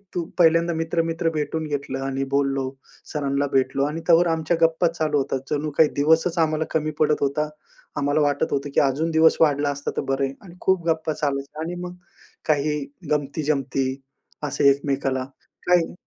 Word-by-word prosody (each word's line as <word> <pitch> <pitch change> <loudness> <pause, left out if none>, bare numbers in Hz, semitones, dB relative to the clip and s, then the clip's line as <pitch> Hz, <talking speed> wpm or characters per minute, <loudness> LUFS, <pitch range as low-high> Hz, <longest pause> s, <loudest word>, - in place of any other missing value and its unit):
तू!" 175 - 0 0.2
पहिल्यांदा 165 0 +4
मित्र-मित्र 165 0 0
भेटून 155 +1 -2
घेतलं 140 -2 -3
आणि 135 0 -2
बोललो. 135 -1 +1 0.4
सरांना 140 -1 0
भेटलो 135 +1 +2
आणि 155 +3 -3
तोवर 170 +1 +6
आमच्या 165 0 0
गप्पा 165 +1 +3
चालू 155 -3 -1
होता. 135 0 -1
जणू 150 0 -1
काही 155 -2 +6
दिवसच 160 +4 +2
आम्हाला 160 -1 +1
कमी 155 -1 0
पडत 150 -1 +4
होता, 150 +2 0 0.5
आम्हाला 145 +2 +1
वाटत 145 -1 +1
होतं 140 0 -1
की - - +5
अजून 145 +4 +1
दिवस 160 0 +5
वाढला 145 -2 +3
असता 140 0 -4
तर - - +2
बरंय 135 0 -1
आणि 175 -3 -13
खूप 185 -3 +1
गप्पा 160 -1 0
चालायच्या 140 +1 -3
आणि 170 +2 -4
मग 180 0 -7 0.5
काही 150 0 +1 0.3
गमती-जमती 140 -2 0 0.6
असे 140 0 +3
एकमेकाला. 135 -2 0 0.4
काही 175 -2 +3
150 Hz, 160 wpm, -23 LUFS, 140-165 Hz, 0.6 s, तोवर